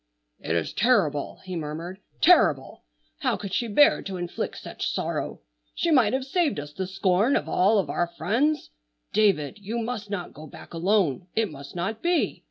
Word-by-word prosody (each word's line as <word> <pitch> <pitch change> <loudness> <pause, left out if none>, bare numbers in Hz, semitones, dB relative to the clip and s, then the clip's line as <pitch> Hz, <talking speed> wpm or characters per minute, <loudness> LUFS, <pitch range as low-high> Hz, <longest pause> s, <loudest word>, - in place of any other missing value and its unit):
"It 80 - -2
is 85 -2 -1
terrible!" 195 - +1
he 185 -1 -5
murmured, 165 +4 -5 0.2
"terrible! 300 - +4 0.3
How - - 0
could 200 -2 -7
she 235 - 0
bear 260 +7 +5
to 190 -2 -5
inflict 175 -1 -4
such - - -4
sorrow! - - -3 0.3
She 335 - 0
might 250 -7 +4
have 260 0 -1
saved 295 - 0
us 145 0 -8
the 190 +2 -3
scorn 195 +6 +2
of - - 0
all 200 +4 +3
of 195 - +1
our 175 - 0
friends. 230 - 0 0.4
David, 200 -4 +2
you 210 +4 -4
must 225 -3 -4
not 190 -4 -4
go 155 +1 -10
back - - -13
alone. 180 -2 +1
It 220 -4 +1
must 140 +1 -10
not 195 +6 -3
be. 345 -1 +1
195 Hz, 180 wpm, -26 LUFS, 170-230 Hz, 0.4 s, bear